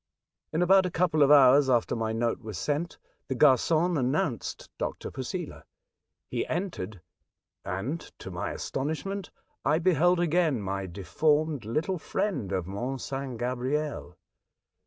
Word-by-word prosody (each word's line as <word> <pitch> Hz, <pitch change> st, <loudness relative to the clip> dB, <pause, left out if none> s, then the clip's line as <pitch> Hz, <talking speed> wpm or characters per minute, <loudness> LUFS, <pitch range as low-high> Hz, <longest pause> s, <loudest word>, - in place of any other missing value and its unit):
In 165 Hz, +3 st, +1 dB
about 190 Hz, +1 st, +5 dB
a -, -, -2 dB
couple 165 Hz, -3 st, +1 dB
of 140 Hz, -, +6 dB
hours 140 Hz, -1 st, +7 dB
after 120 Hz, -1 st, +2 dB
my 110 Hz, -1 st, -1 dB
note 115 Hz, +1 st, 0 dB
was 110 Hz, -5 st, -6 dB
sent, 150 Hz, +4 st, -2 dB, 0.3 s
the 130 Hz, -, -2 dB
g -, -, +5 dB
argon 160 Hz, +6 st, +3 dB
announced 130 Hz, -, -1 dB
Dr. -, -, -4 dB
Posela. -, -, -5 dB, 0.7 s
He -, -, 0 dB
entered, 110 Hz, -, -4 dB, 0.6 s
and, 115 Hz, -, -3 dB, 0.2 s
to -, -, -8 dB
ray -, -, -3 dB
astonishment, 160 Hz, +7 st, -3 dB, 0.3 s
I 150 Hz, +3 st, +3 dB
beheld 175 Hz, +1 st, +3 dB
again 165 Hz, -5 st, +2 dB
my 95 Hz, -1 st, -3 dB
deformed 145 Hz, -, 0 dB
little 160 Hz, -, -1 dB
friend 140 Hz, -, -2 dB
of 95 Hz, -3 st, -1 dB
Mont 120 Hz, +8 st, -4 dB
St. 135 Hz, -1 st, -4 dB
Gabriel. 125 Hz, -, -2 dB
140 Hz, 135 wpm, -28 LUFS, 115-165 Hz, 0.7 s, hours